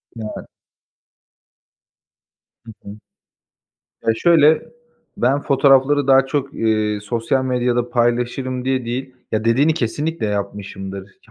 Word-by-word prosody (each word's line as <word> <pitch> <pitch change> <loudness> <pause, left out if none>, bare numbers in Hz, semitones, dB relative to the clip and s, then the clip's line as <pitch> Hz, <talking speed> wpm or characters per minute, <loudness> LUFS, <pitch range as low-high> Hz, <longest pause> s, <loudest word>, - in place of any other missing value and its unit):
Evet. 110 -2 -7 2.2
Hı 115 - -10
hı. 100 - -9 1.2
Eee, 115 - +4
şöyle, 160 0 +4 0.5
ben 135 +4 +1
fotoğrafları 140 0 +3
daha 135 -1 +5
çok, 140 0 -3
eee, 110 -2 0
sosyal 115 +5 -1
medyada 125 -1 0
paylaşırım 125 +1 -1
diye 130 -1 -1
değil 130 +2 -5 0.2
Ya, 110 0 -1
dediğini 135 +8 +3
kesinlikle 150 +1 -2
yapmışımdır, 100 -1 -5
ki - - -27
125 Hz, 105 wpm, -19 LUFS, 110-135 Hz, 2.2 s, daha